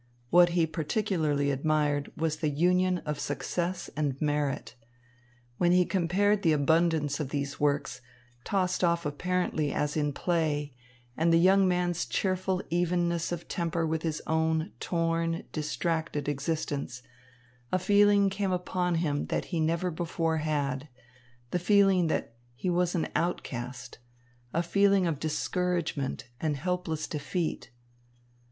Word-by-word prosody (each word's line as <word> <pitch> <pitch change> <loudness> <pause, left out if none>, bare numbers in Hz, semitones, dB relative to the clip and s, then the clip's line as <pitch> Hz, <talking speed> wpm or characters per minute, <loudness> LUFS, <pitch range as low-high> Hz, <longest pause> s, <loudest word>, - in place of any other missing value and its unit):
What 175 0 +7
he 165 - +4
particularly 160 -3 0
admired 145 0 0
was 155 -1 0
the 155 -1 0
union 180 +4 +2
of 150 -1 -3
success 175 +5 -2
and 145 -3 -1
merit. 145 -4 -1 0.9
When 175 0 +4
he 180 0 +5
compared 195 +3 +2
the 165 -4 +3
abundance 155 0 +2
of 145 -4 -3
these 140 -1 -3
works, 140 -4 0 0.4
tossed 185 -2 0
off 170 -1 +2
apparently 155 0 -1
as 150 0 -1
in 150 -2 +1
play, 150 -3 -1 0.4
and 165 +3 +2
the 165 - +6
young 190 +3 +5
man's 180 -1 0
cheerful 185 0 0
evenness 175 -1 0
of 175 -1 -5
temper 170 -1 -1
with 160 0 -1
his 160 -2 -3
own 160 +2 0
torn, 165 -1 -1
distracted 155 -1 -2
existence, 140 -3 -3 0.7
a - - +3
feeling 200 +1 +4
came 195 0 -1
upon 180 -1 0
him 150 -3 -1
that - - -1
he - - +1
had 155 - +2
never 170 +2 0
before 165 -1 -1
had, 145 -2 -2 0.6
the 180 - +1
feeling 195 -1 +4
that 135 - -2 0.2
he 180 +9 -1
was 175 0 +1
an 165 - 0
outcast, 125 -7 -3 0.5
a 170 +5 0
feeling 200 +2 +3
of 160 -5 -1
discouragement 160 -4 -2
and 150 -1 -1
helpless 180 -1 -2
defeat. 160 +3 -3
165 Hz, 135 wpm, -29 LUFS, 150-180 Hz, 0.9 s, What